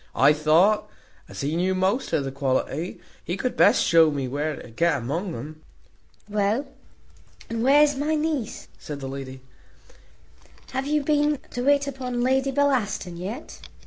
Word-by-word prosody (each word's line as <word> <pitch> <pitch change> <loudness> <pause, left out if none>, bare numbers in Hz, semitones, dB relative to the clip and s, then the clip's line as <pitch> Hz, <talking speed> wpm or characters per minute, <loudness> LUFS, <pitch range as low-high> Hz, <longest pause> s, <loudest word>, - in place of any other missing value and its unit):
I 140 +3 +6
thought, 160 +8 +3 0.4
as - - -7
he 145 +3 -1
knew 185 +2 +1
most 190 +8 0
of 145 - +1
the 135 - -4
quality, 140 +4 -2 0.2
he 175 - -3
could 250 +5 -2
best - - +5
shew 165 -1 +5
me 140 -3 -2
where 145 +4 -2
to 120 - -12
get 165 +5 +1
among 160 - -3
um." 155 +6 -8 0.7
"Well, 210 +6 0 0.9
and 230 0 -2
where's 290 +3 +5
my 300 +3 0
niece?" 300 -7 -2
says 150 - -7
the 135 -1 -6
lady; 135 -1 -7 1.3
"have 265 +1 -2
you 300 0 +1
been 295 0 +2
to 245 - -3
wait 285 +1 +3
upon 255 -3 -4
Lady 265 +2 +2
Bellaston 255 -10 0
yet?" 200 - -7
195 Hz, 155 wpm, -24 LUFS, -, 1.3 s, I